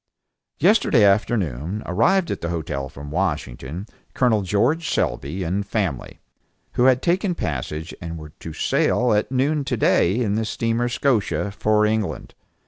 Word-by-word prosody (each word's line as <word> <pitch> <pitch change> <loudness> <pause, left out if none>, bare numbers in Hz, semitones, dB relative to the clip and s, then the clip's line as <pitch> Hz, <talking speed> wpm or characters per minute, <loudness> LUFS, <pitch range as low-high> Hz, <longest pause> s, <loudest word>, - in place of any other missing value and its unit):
Yesterday 170 - +4
afternoon 100 - +1
arrived 170 - +2
at - - -4
the 85 - -3
hotel 70 -5 -3
from 70 +2 -9
Washington, 80 -2 -3 0.3
Col. 115 -5 +3
George 125 - +1
Selby 70 +10 -1
and 95 +4 -1
family, 95 - -3 0.5
who 125 - +2
had 130 -1 +4
taken 180 +1 +1
passage 75 - -4
and 85 -1 -5
were 75 -1 -9
to 80 - -7
sail 120 +8 +1
at 105 +4 0
noon 140 +3 +1
to - - -2
day 90 +4 +3
in 110 -5 0
the 110 +2 0
steamer 115 +2 -1
Scotia 120 -6 0
for 105 +1 +2
England. 110 -1 -2
105 Hz, 145 wpm, -22 LUFS, 80-125 Hz, 0.5 s, Yesterday